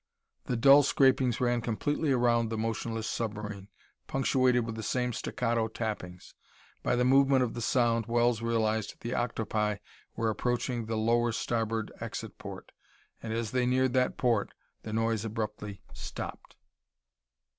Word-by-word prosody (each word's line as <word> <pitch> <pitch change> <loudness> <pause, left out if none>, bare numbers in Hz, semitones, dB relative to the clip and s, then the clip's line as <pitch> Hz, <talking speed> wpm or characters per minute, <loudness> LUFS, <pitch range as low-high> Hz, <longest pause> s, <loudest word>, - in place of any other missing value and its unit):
The 125 - -1
dull 135 +5 +8
scrapings 130 -3 +3
ran 120 -1 +1
completely 145 +6 -1
around 120 -2 +3
the 110 - -3
motionless 115 0 -2
submarine, 105 -3 -4 0.4
punctuated 130 -3 +2
with 115 - -4
the 110 - -5
same 125 +2 -1
staccato 115 0 -1
tappings. 105 -5 -5 0.5
By - - +1
the 125 0 +2
movement 135 0 +5
of 120 - -2
the 120 - -5
sound, 115 -1 +2
Wells 120 -1 +2
realized 110 -2 0
the 120 +2 -3
octopi 110 -3 -1 0.4
were 110 -1 0
approaching 120 0 -1
the 110 -1 -1
lower 120 +2 +2
starboard 115 -1 -1
exit - - -6
port. - - -9 0.5
And 110 - -5
as 115 -1 -2
they 125 -1 +1
neared 130 0 +2
that 130 -1 +1
port, 115 -5 +1 0.3
the 110 - -7
noise 115 -1 0
abruptly 105 -2 -5
stopped. - - -7
115 Hz, 145 wpm, -30 LUFS, 110-125 Hz, 0.5 s, dull